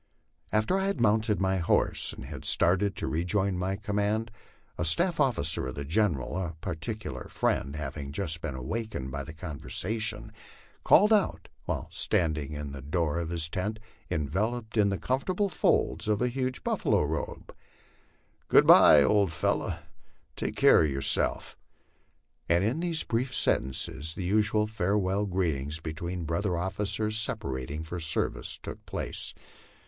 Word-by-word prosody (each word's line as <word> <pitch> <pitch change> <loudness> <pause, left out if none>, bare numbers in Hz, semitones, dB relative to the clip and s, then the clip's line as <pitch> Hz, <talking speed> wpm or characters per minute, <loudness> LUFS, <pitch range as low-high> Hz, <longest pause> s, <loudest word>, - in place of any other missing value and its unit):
After 110 - +2
I 195 - 0
had 200 -8 -2
mounted 110 -1 +2
my 95 0 +1
horse, 85 - +2
and - - -9
had - - -8
started 95 +3 +3
to - - -3
rejoin 95 +4 0
my 95 +2 -1
command, 105 +2 -1 0.4
a - - -2
staff 170 - +1
officer 80 - +4
of 65 - -6
the 70 - -5
General, 80 -5 0
a 85 -2 -5
particular 95 +5 -5
friend, 70 +2 -1
having 70 -1 -5
just 80 0 -3
been 75 -5 -4
awakened 65 - -4
by 70 0 -4
the 80 - -9
conversation, 105 +7 -2 0.5
called 210 +2 +6
out, 210 -2 +1 0.2
while - - -3
standing 75 -4 0
in 75 -1 -5
the 70 -1 -8
door 80 +3 -1
of 85 -1 -4
his 85 -2 0
tent 100 +6 -3 0.3
enveloped 105 - -2
in 105 -2 +4
the 95 - -1
comfortable 180 - -1
folds - - +1
of 105 -1 +1
a 125 - +1
huge 130 0 -3
buffalo - - +1
robe, 75 +1 -4 0.4
" - - -38
Good - - +6
by, 75 - +8
old 100 +1 +3
fellow; 80 - -1 0.6
take - - -3
care - - +6
of 75 - +1
yourself!" 70 0 +1 0.9
and 85 +2 +3
in 115 +9 0
these 170 -2 -1
brief 125 +3 -2
sentences 75 +4 -1
the 95 - -4
usual 105 +2 +2
farewell 100 -1 0
greetings 80 -5 -1
between 85 +2 -5
brother 85 +3 -1
officers 105 +4 -1
separating 75 - -3
for 85 +2 -6
service 80 -1 -1
took - - -8
place. - - -3
95 Hz, 150 wpm, -28 LUFS, 80-110 Hz, 0.9 s, by